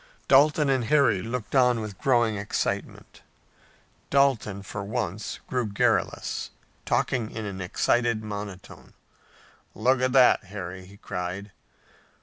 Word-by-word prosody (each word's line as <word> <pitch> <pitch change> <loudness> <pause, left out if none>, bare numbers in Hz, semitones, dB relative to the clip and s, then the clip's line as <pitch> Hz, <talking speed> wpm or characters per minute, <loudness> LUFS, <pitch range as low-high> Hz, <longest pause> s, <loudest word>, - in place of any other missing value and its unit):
Dalton 150 +2 +5
and 130 -3 +1
Harry 130 -8 +3
looked 115 0 -5
on 125 -3 +4
with 105 -3 -7
growing 120 -5 +2
excitement. 100 0 -4 0.9
Dalton, 130 -8 +2
for 100 +1 -6
once, 105 -2 -4
grew 125 -3 -1
garrulous, 100 0 0 0.4
talking 115 -4 0
in 110 -2 -6
an 95 -2 -5
excited 115 +4 +1
monotone. 100 -3 -8 0.8
"Look 125 +3 +2
at 130 0 +2
that, 125 -6 +5
Harry!" 95 -1 -7
he 100 +1 -15
cried. 90 +2 -5
110 Hz, 120 wpm, -26 LUFS, 100-125 Hz, 0.9 s, Dalton